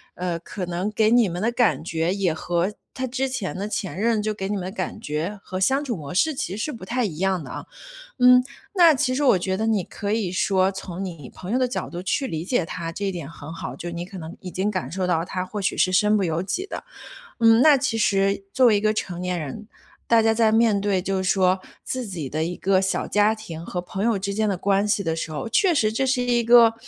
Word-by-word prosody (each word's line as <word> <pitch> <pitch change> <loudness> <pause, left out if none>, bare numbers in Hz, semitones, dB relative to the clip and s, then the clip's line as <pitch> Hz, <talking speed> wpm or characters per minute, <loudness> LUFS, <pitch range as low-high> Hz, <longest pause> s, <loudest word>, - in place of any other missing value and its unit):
呃， 175 -2 -2
可 185 +2 -6
能 175 +3 -2
给 215 0 +2
你 240 -2 +5
们 175 +1 -4
的 230 +3 +1
感 240 -6 +2
觉， 165 +1 -1
也 195 -4 0
和 175 +4 -1 0.2
他 260 - -3
之 265 +2 -1
前 255 -7 -3
的 200 +2 -3
前 190 -4 -4
任 225 0 +2
就 215 +1 -1
给 195 -2 -4
你 210 - -1
们 185 -3 -3
的 185 - -4
感 215 - -4
觉 165 +5 -3
和 185 - -5
相 265 +9 +2
处 250 -5 -2
模 145 -1 -7
式， 310 - +2
其 195 -6 -3
实 265 +8 -3
不 230 - -10
太 245 +4 0
一 165 -7 -5
样 190 -1 +1
的 - - -9
啊。 - - -6 0.6
嗯， 250 0 +7 0.3
那 340 -4 +7
其 255 -1 0
实 290 - +1
我 250 -7 +6
觉 190 +1 -1
得 220 +3 -1
你 220 -4 +2
可 200 +4 -4
以 215 -5 0
说 190 0 +2
从 190 -1 -6
你 165 -8 -7
朋 185 - -8
友 250 - +2
的 255 - +2
角 245 - -4
度 175 - -5
去 235 +8 0
理 160 0 -4
解 200 -2 +1
他， 165 0 -5
这 200 +4 -3
一 - - +1
点 170 -6 -6
很 160 -1 -9
好， 130 -6 -6
就 175 +4 -6
你 170 0 -5
可 190 0 -9
能 160 -1 -8
已 185 - -7
经 190 +4 -1
感 185 -4 -3
受 185 +1 -1
到 165 -2 +1
他 185 0 -3
或 205 +3 -5
许 - - 0
是 185 - +3
身 210 +3 +4
不 205 - +1
由 165 -1 -1
己 355 - -3
的。 - - -7 0.6
嗯， 225 +1 +6
那 300 -1 +7
其 265 -3 -1
实 195 -1 +2
作 260 -1 +4
为 220 -3 +5
一 - - +1
个 215 +1 +2
成 180 -4 -3
年 180 -1 -2
人， 210 +9 -7 0.4
大 230 -1 +6
家 225 0 +3
在 225 -1 +3
面 220 -2 +3
对 200 -2 +1
就 190 0 -1
是 185 - +1
说 185 -1 +3 0.2
自 255 -1 -3
己 170 -8 -5
的 155 +1 -1
一 175 +2 -4
个 190 0 +2
小 190 - -1
家 210 +1 +3
庭 170 -7 -8
和 180 - -3
朋 190 +3 -4
友 230 -3 +2
之 200 +1 -3
间 215 +1 +1
的 195 - 0
关 200 +2 +1
系 205 -1 +1
的 165 -1 0
时 165 - -4
候， 150 +9 -4
确 365 - +3
实 215 -7 +2
这 250 +4 0
是 260 -1 +1
一 240 -1 +2
个， 230 -1 +7
195 Hz, 280 characters per minute, -23 LUFS, 180-225 Hz, 0.6 s, 嗯